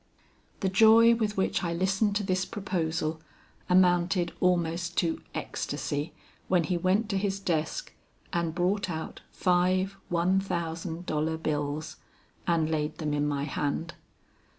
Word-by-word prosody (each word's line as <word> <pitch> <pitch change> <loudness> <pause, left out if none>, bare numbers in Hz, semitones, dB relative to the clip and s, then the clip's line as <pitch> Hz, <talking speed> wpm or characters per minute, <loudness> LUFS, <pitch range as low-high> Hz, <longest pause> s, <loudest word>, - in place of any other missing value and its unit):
"The 195 - +1
joy 225 +4 +7
with 215 -3 -1
which 190 - +1
I 170 -1 -1
listened 195 +4 +1
to 205 - +1
this 185 -1 0
proposal 165 -6 -2 0.5
amounted 180 -1 +3
almost 175 -1 0
to 165 -2 +1
ecstacy 145 +3 -3 0.4
when 180 -2 +3
he 175 +3 -1
went 185 +5 +1
to 195 -2 0
his 195 0 -1
desk 175 - -2 0.4
and 170 -2 -1
brought 190 +2 0
out 160 -1 -5
five 185 +2 +1
one 175 +2 +2
thousand 170 -2 -4
dollar 160 0 -1
bills 150 -1 -3 0.5
and 165 -2 +2
laid 155 -1 -1
them 150 -2 -2
in 145 0 +1
my 140 -1 -1
hand. 145 +3 -2
175 Hz, 135 wpm, -28 LUFS, 160-190 Hz, 0.5 s, joy